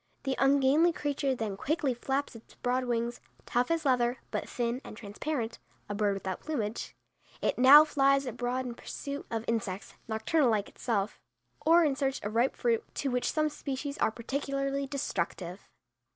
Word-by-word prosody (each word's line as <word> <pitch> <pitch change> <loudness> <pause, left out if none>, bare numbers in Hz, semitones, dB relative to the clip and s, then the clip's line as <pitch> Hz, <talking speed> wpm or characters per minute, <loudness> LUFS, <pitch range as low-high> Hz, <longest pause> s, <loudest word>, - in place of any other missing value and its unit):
The 270 -1 0
ungainly 280 +5 +5
creature 285 -3 -1
then 220 -4 -3
quickly 290 - 0
flaps 270 +2 -2
its 230 - -14
broad 255 +1 0
wings, 235 0 -1 0.2
tough 245 +1 +1
as 330 -2 0
leather, 250 -2 +2
but - - -3
thin 240 +1 -2
and 215 - -10
transparent; 230 +3 -4 0.3
a 205 - -3
bird 205 -1 +1
without 190 -1 -4
plumage, 235 -8 -3 0.4
it - - 0
now 285 +4 +10
flies 275 -2 +3
abroad 250 +1 -2
in 245 - -4
pursuit 280 +4 -6
of 225 -1 -3
insects 205 -4 -2
nocturnal 240 +6 +2
like 210 -3 +1
itself 210 -3 -2 0.5
or 335 +1 +7
in 285 -3 +1
search 270 -1 -1
of 205 +1 -3
ripe 240 +4 +2
fruit, 235 -2 +1
to 275 - -1
which 250 0 0
some 310 0 +2
species 280 -1 -4
are - - +3
particularly 275 +3 -2
destructive. 185 -8 -3
255 Hz, 165 wpm, -30 LUFS, 230-280 Hz, 0.5 s, now